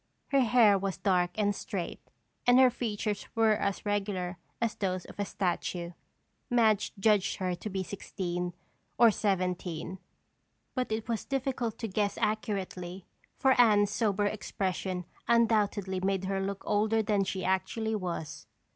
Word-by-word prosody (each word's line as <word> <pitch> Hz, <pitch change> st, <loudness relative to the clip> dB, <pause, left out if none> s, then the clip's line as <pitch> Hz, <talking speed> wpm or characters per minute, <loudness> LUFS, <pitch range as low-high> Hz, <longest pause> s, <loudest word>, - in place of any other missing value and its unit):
Her 275 Hz, -, +4 dB
hair 230 Hz, -5 st, +5 dB
was 195 Hz, -1 st, -2 dB
dark 180 Hz, -3 st, +2 dB
and 205 Hz, -1 st, +1 dB
straight 190 Hz, -3 st, -4 dB, 0.5 s
and 245 Hz, 0 st, +7 dB
her 260 Hz, -1 st, +7 dB
features 210 Hz, -3 st, -3 dB
were 225 Hz, -1 st, +4 dB
as 200 Hz, -2 st, -2 dB
regular 195 Hz, -4 st, -2 dB, 0.2 s
as 230 Hz, -2 st, 0 dB
those 185 Hz, -2 st, -2 dB
of -, -, -13 dB
a 205 Hz, -, +1 dB
statue. 175 Hz, -2 st, -2 dB, 0.6 s
Madge 220 Hz, -4 st, +3 dB
judged 205 Hz, -1 st, +3 dB
her 185 Hz, -1 st, -1 dB
to 180 Hz, +5 st, -5 dB
be 190 Hz, -1 st, -2 dB
sixteen 180 Hz, -2 st, -4 dB, 0.4 s
or 235 Hz, -2 st, +7 dB
seventeen 180 Hz, -3 st, -2 dB, 0.7 s
but 255 Hz, -3 st, -2 dB
it 220 Hz, +1 st, -2 dB
was 230 Hz, -2 st, -1 dB
difficult 255 Hz, -4 st, -2 dB
to 230 Hz, -, -3 dB
guess 205 Hz, 0 st, -1 dB
accurately 195 Hz, -4 st, -2 dB, 0.3 s
for 265 Hz, 0 st, +4 dB
Anne's 205 Hz, -3 st, +4 dB
sober 205 Hz, -2 st, +1 dB
expression 190 Hz, -3 st, -2 dB, 0.2 s
undoubtedly 210 Hz, -5 st, +2 dB
made 190 Hz, 0 st, 0 dB
her 195 Hz, 0 st, -1 dB
look 195 Hz, 0 st, -3 dB
older 220 Hz, +2 st, +2 dB
than 205 Hz, -2 st, +2 dB
she 190 Hz, 0 st, -3 dB
actually 220 Hz, +4 st, 0 dB
was. 175 Hz, -6 st, -5 dB
205 Hz, 145 wpm, -30 LUFS, 185-220 Hz, 0.7 s, and